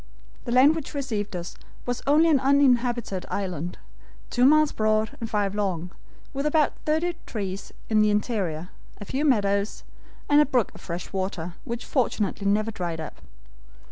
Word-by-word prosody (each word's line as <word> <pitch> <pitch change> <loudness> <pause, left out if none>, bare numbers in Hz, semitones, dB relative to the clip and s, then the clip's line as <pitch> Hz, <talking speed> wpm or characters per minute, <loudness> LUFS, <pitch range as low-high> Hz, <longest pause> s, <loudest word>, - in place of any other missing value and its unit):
"The 235 - -3
land 260 +5 +6
which 310 -2 -6
received 220 -8 -3
us 175 -1 -5 0.3
was 245 0 -2
only 305 +3 +5
an 285 - +5
uninhabited 245 -7 +2
island, 180 -4 -3 0.5
two 245 +1 +3
miles 305 +1 +5
broad 215 0 +1
and 225 - -3
five 205 -2 0
long, 185 -4 -2 0.4
with 275 +2 -1
about 300 -1 +3
thirty 320 +3 +1
trees 195 -3 -5 0.2
in 215 -1 +3
the 215 - +4
interior, 195 -6 -1 0.3
a 205 - -7
few 270 +8 -2
meadows, 200 -7 +1 0.4
and 290 0 +6
a - - +4
brook 250 -6 +1
of - - -13
fresh 175 +2 -6
water, 185 -3 -3
which 235 0 -4
fortunately 210 -6 0
never 215 +2 +2
dried 175 -6 -4
up. 160 - -8
215 Hz, 160 wpm, -25 LUFS, 195-270 Hz, 0.5 s, land